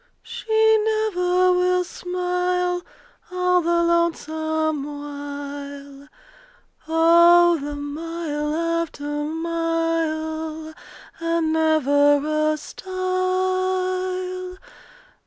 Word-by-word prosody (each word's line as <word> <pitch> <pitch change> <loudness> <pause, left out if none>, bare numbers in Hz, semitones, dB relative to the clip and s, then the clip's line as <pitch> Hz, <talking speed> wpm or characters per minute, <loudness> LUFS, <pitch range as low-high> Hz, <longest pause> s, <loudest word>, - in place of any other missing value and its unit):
She 440 0 +2
never 370 -4 +1
will 360 0 +2
smile 360 0 -2 0.5
All 360 0 +2
the 340 0 +1
lonesome 315 -3 0
while. 285 -1 -8 0.8
Oh 340 +1 +5
the 290 +1 -5
mile 300 0 -4
after 335 -2 -2 0.2
mile, 320 -1 -2 0.5
And 330 -1 0
never 305 -1 +3
a - - -3
stile! 370 +1 -2
335 Hz, 65 wpm, -22 LUFS, 310-360 Hz, 0.8 s, Oh